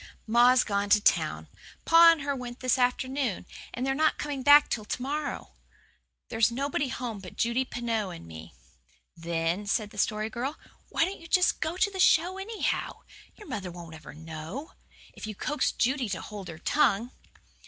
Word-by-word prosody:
"Ma's 240 +3 +5
gone 200 -1 -1
to 210 - +6
town - - +1 0.4
pa 335 +1 +8
and 330 -3 -1
her 280 -1 -1
went 245 -1 -7
this 255 0 +1
afternoon 255 -4 0 0.3
and 250 - -3
they're 270 - +1
not 310 +3 +2
coming 285 -2 -4
back 290 +2 +7
till 215 - -3
to 210 - -4
morrow. 285 +3 -4 0.8
There's 225 +1 +2
nobody 280 +3 -1
home 240 -4 -5
but 185 -2 -11
Judy 235 +3 +1
Pineau 230 -5 -2
and 170 - -9
me." 80 -1 -11 0.6
"Then," 170 +4 -2
said 210 0 -1
the - - -8
Story 215 0 0
Girl, 260 +6 -4 0.3
"why 330 - +2
don't 380 -1 -6
you 330 - -11
just 360 +1 +3
go 320 +3 -2
to 405 +2 +2
the 380 - -7
show 365 +1 +4
anyhow? 430 +3 -3 0.3
Your 420 - -14
mother 205 -10 -4
won't 170 -2 -10
ever 160 -2 -11
know, 160 - -8 0.4
if - - -8
you 215 - -6
coax 295 +9 -1
Judy 255 -2 0
to 185 - -3
hold 205 -3 -8
her 165 -2 -8
tongue." 240 - +1
245 Hz, 180 wpm, -28 LUFS, 205-290 Hz, 0.8 s, pa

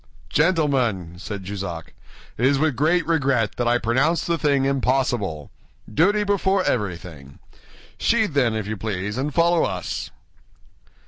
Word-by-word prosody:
"Gentlemen," 130 - +1
said 100 0 -6
Jussac, 95 -4 -6 0.4
"it 120 - -4
is 140 0 +3
with 155 -2 +1
great 160 +6 +2
regret 135 -9 +1
that 120 - 0
I 120 +1 +4
pronounce 130 +8 +1
the 170 - +1
thing 140 -2 +2
impossible. 125 - 0 0.4
Duty 205 - +3
before 195 -1 +1
everything. 85 - -4 0.6
Sheathe, 220 -7 +2
then, 125 -5 +2
if 110 -2 -2
you 110 +1 -4
please, 105 +2 -3
and 145 +3 -1
follow 170 +2 +3
us." 90 -2 -3
130 Hz, 135 wpm, -23 LUFS, 100-160 Hz, 0.6 s, I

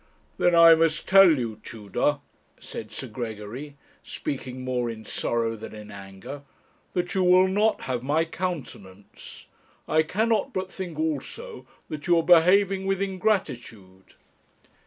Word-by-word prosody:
'Then 175 -1 +3
I 165 0 +9
must 160 -1 +1
tell 190 -5 +7
you, 110 -4 -4
Tudor,' 115 +7 -2 0.4
said 110 -1 -8
Sir 120 - -6
Gregory, 120 +4 -7 0.2
speaking 130 -2 -6
more 125 -2 -1
in 110 -1 -8
sorrow 115 +1 -1
than 110 0 -9
in 105 0 -10
anger, 95 +7 -9 0.5
'that 175 -1 -2
you 190 - +1
will 180 +1 +5
not 210 +3 +1
have 125 -2 -3
my 150 +5 +1
countenance. 140 - -7 0.4
I 155 - +3
cannot 215 +6 0
but 185 0 -3
think 180 -5 -6
also 160 - -4 0.2
that 150 -1 -7
you 175 -1 +4
are 165 - +2
behaving 190 +3 +4
with 195 -1 0
ingratitude.' 140 - -3
150 Hz, 135 wpm, -25 LUFS, 115-185 Hz, 0.5 s, I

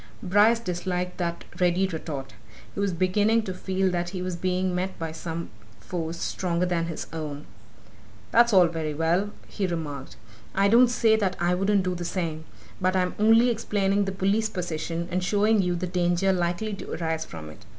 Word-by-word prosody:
Bryce 205 +4 +5
disliked 180 -3 -3
that 170 -1 -2
ready 180 +1 +3
retort. 155 -6 -5 0.4
He - - -6
was 200 -1 +1
beginning 205 +6 +2
to 190 - -4
feel 190 0 0
that 175 0 -1
he 180 -1 -4
was 185 -1 -3
being 185 +1 0
met 185 +1 -2
by 165 -1 -4
some 165 -1 -5 0.3
force 170 -1 -4
stronger 180 -1 -1
than 170 -2 0
his 165 - -5
own. 150 -2 -5 0.9
"That's 235 +1 +5
all 185 -3 +7
very 160 -3 -3
well," 170 +6 +1 0.2
he 195 -3 -2
remarked. 150 -6 -5 0.4
"I 195 +1 +4
don't 240 +3 +7
say 225 -2 +3
that 195 -4 0
I 175 +1 +2
wouldn't 195 +2 +2
do 185 0 -1
the 175 -1 -5
same. 165 -3 -3 0.4
But 185 +1 +2
I'm 180 -1 +1
only 225 +3 +5
explaining 205 -3 +1
the 195 - -2
police 195 +3 +1
position, 170 -3 -3
and 180 +1 0
showing 210 +2 +3
you 180 -1 0
the 175 +1 -2
danger 180 +1 +1
likely 180 +4 -1
to 195 - -6
arise 160 -1 -2
from 80 -2 -9
it. - - -15
180 Hz, 180 wpm, -26 LUFS, 170-195 Hz, 0.9 s, all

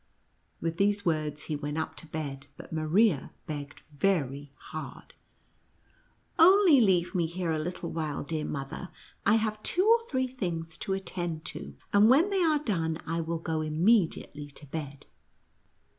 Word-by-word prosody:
With 165 0 -2
these 205 0 +2
words 155 -3 0
he 155 - -3
went 145 +1 -4
up 160 - -2
to 165 - -8
bed, 140 -3 -5
but - - -10
Maria 160 +1 +2
begged 145 -1 -6
very 145 -3 -1
hard, 155 +3 -9 0.6
" - - -37
Only 350 -4 +7
leave 185 -4 +3
me 175 -4 +1
here 170 0 -2
a 155 - 0
little 170 +1 -4
while, 155 -3 -3
clear 155 0 -2
mother. 140 +6 -5 0.4
I 210 - +6
have 215 -1 0
two 365 - +2
or 460 +1 +4
three 260 -2 +1
things 175 -10 -4
to 190 - -2
attend 175 -4 -3
to, 70 0 -8 0.2
and 205 +2 +6
when 320 +11 +5
they 390 -2 +2
are 315 -3 +4
done 170 - -1
I 165 +1 -1
will 165 +1 -2
go 160 -1 -2
immediately 160 -2 +1
to 145 +1 -13
bed." 145 -1 -6
165 Hz, 160 wpm, -29 LUFS, 155-205 Hz, 0.6 s, Only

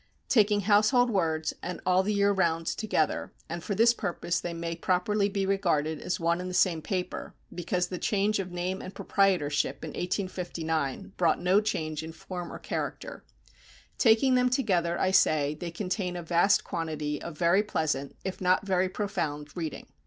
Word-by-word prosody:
Taking 210 -3 +4
Household 215 +5 +4
Words 160 -5 0
and 180 - -5
All 185 0 +4
the 200 +2 -1
Year 200 0 +3
Round 165 -4 +1
together 180 -5 -1
and 170 +1 -5
for 200 - -2
this 230 +3 +5
purpose 175 -5 -2
they 175 - -4
may 165 0 -4
properly 200 +4 +1
be 195 -1 -1
regarded 165 -6 0
as 180 - -2
one 170 +1 +1
and 185 - -5
the 180 - -4
same 180 -3 +3
paper, 185 +1 -4 0.2
because 175 +1 -1
the 180 - -4
change 210 0 +1
of 185 -2 -4
name 180 +2 -3
and 185 - -9
proprietorship 180 -7 +1
in - - -4
1859 175 -5 -3
brought 170 -3 +2
no 185 +4 +3
change 155 -8 -2
in 160 0 -8
form 175 +2 -7
or - - -6
character, - - -5 0.8
taking 235 +3 +5
them 250 0 +4
together, 180 -10 +1
I 185 - +2
say, 150 -6 +3
they 170 +3 -6
contain 180 +1 -3
a 175 - -5
vast 175 +4 +3
quantity 155 -3 -3
of 170 -3 -7
very 175 +4 +4
pleasant, 155 -9 -2
if 190 0 -4
not 185 +1 +2
very 185 -1 +1
profound, 150 -8 -3
reading. 160 -4 -5
180 Hz, 175 wpm, -28 LUFS, 165-200 Hz, 0.8 s, this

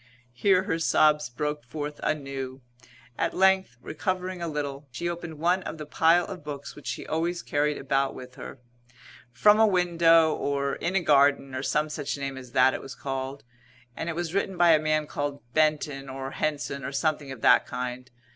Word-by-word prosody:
Here 185 +8 +3
her 165 - -1
sobs 150 -3 +3
broke 150 +4 -3
forth 145 +3 -6
anew. 135 -3 -3 0.6
At - - 0
length, 190 -8 +3
recovering 185 +5 -3
a 170 - -2
little, 145 -2 -4
she 130 +8 -4
opened 170 -2 -5
one 175 +4 +2
of 165 - -6
the 155 - -7
pile 165 +3 +3
of 185 -5 -8
books 145 -1 -7
which 150 - -11
she - - -4
always 170 +2 -2
carried 145 0 0
about 135 0 0
with 125 0 -10
her - - -9 0.7
"From 210 - +5
a 220 - +6
Window" 170 -4 +4
or 140 -1 -1
"In 180 - -2
a 185 - +2
Garden," 140 -2 +3
or 130 - -3
some 150 +2 0
such 150 -2 -4
name 140 -1 -4
as 125 -2 -11
that 130 0 +5
it - - -4
was 135 -2 -9
called, 135 0 -5 0.5
and 165 - -4
it 165 - -3
was 170 -1 -3
written 195 -1 -1
by 175 -1 +6
a 155 - +6
man 155 0 +1
called 145 -1 -4
Benton 150 -3 +1
or 135 0 -5
Henson, 145 -2 -2
or - - -4
something 150 -1 -1
of 125 -4 -9
that - - +5
kind. 125 0 -5
150 Hz, 190 wpm, -27 LUFS, 135-170 Hz, 0.7 s, a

